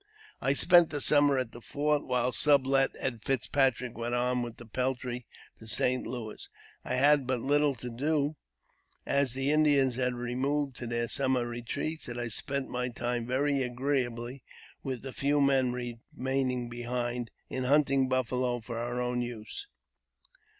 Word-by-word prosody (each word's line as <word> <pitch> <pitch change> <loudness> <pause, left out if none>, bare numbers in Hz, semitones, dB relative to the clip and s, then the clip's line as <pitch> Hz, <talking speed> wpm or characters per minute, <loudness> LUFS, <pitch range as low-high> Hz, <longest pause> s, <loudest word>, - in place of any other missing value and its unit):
I 135 - +2
spent 175 +3 +6
the 145 - -2
summer 145 -1 +4
at 130 -3 -2
the 120 - -11
fort, 145 +3 0
while 125 0 +1
Sublet 135 -1 +4
and 120 -4 -3
Fitzpatrick 130 -2 +1
went 120 +1 -2
on 125 0 +1
with 120 -1 -5
the 120 - -11
peltry 125 +1 -3 0.3
to 110 - -12
St. 125 +4 +1
Louis. 115 -4 -6 0.3
I 125 - -2
had 140 0 +4
but 130 -1 0
little 145 +2 +2
to 125 +1 -6
do, 145 +4 0 0.7
as 140 -3 +1
the 135 +2 +1
Indians 145 -5 +4
had 125 -1 0
removed 130 +3 -1
to 120 - -5
their 120 0 -1
summer 130 -1 +1
retreats, 120 +7 -4
and 120 0 -5
I 120 -1 -2
spent 140 +5 -2
my 125 0 -2
time 120 0 -2
very 140 +2 +1
agreeably 125 -1 -2 0.4
with 130 -3 -4
the 135 -1 -6
few 145 +1 +1
men 135 -3 +3
remaining 125 +1 -3
behind, 120 0 -3 0.2
in 130 -1 -3
hunting 135 -1 +3
buffalo 125 -1 0
for 115 0 -6
our 120 +1 -2
own 125 0 -1
use. 120 - -6
125 Hz, 155 wpm, -30 LUFS, 120-140 Hz, 0.7 s, spent